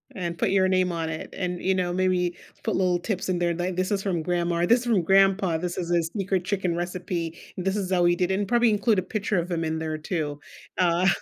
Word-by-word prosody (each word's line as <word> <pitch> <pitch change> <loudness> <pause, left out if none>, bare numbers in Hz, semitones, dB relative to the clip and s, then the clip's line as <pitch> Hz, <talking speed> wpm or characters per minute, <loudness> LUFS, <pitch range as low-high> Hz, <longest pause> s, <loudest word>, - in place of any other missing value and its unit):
And 170 -3 -4
put - - +1
your 190 -1 +3
name 185 -1 +2
on 165 -1 -2
it 155 - -5
and, 180 -2 -3
you 190 0 +1
know, 175 -1 0
maybe 180 -1 +1 0.3
put 220 - 0
little 180 -2 +2
tips 190 +1 -3
in 180 - +1
there, 175 -1 +1
like, 175 +1 -2
"This 185 +3 -1
is 195 -1 +1
from 175 -5 -1
grandma, 175 0 0
this 235 +6 +5
is 245 - -7
from 200 -7 +3
grandpa. 195 -2 +3
This 175 0 -4
is 175 -1 -3
a 170 -1 +3
sneaker 190 +3 -1
chicken 180 -2 -1
recipe, 175 -1 -3 0.2
and 180 - -4
this 195 +1 +1
is 190 -2 -2
how 175 -1 +3
we 175 0 +4
did 180 +1 0
it." 190 - +1
And 200 - -1
probably 240 -1 +3
include 210 0 +2
a 185 - +1
picture 205 0 -2
of 175 +1 -2
him 165 -1 -1
in 160 0 -1
there 160 -1 -3
too, 150 -3 -3 0.4
uh, 175 +1 +3
180 Hz, 255 wpm, -25 LUFS, 170-190 Hz, 0.4 s, this